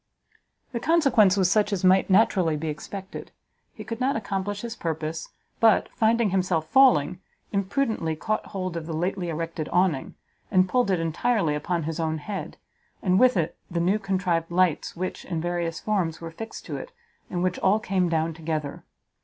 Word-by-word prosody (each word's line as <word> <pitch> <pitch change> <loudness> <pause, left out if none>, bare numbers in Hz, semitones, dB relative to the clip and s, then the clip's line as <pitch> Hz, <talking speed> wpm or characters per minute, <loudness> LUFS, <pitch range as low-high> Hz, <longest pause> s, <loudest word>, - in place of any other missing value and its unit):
The 240 - -2
consequence 250 - +4
was 185 -2 +3
such 210 0 +3
as 195 -3 -2
might 185 +1 +4
naturally 185 -5 +3
be 155 +1 -3
expected; 190 +6 -7 0.4
he 215 - -9
could 225 +2 -6
not 260 +2 +1
accomplish 200 -1 -3
his 235 -1 -5
purpose, 160 -2 -4 0.3
but, 225 -2 +4
finding 225 -2 +2
himself 180 -4 0
falling, 180 - +4 0.3
imprudently 200 - 0
caught 215 +7 -2
hold 185 -3 -4
of 165 -1 -5
the 165 - -3
lately 175 +2 -2
erected 165 -1 -4
Awning, 175 -6 +1 0.3
and 185 -3 +4
pulled 245 +2 +1
it 185 -3 +2
entirely 165 +1 +1
upon 165 +3 -2
his 160 +1 -4
own 160 -1 0
head, 195 +6 -6 0.5
and 185 0 +3
with 255 -4 +5
it 165 -2 -1
the 170 - -2
new 185 +5 +2
contrived 185 -4 -1
lights, 175 -2 +1
which, 185 +2 -4
in 170 -3 -3
various 170 0 -2
forms, 185 -7 -1
were 165 -1 -7
fixed 225 +7 -8
to - - -4
it, - - -8 0.4
and 175 -1 -2
which 185 -1 0
all 205 +3 +3
came 185 -4 0
down 160 0 0
together. 155 -3 -4
185 Hz, 175 wpm, -25 LUFS, 165-210 Hz, 0.5 s, with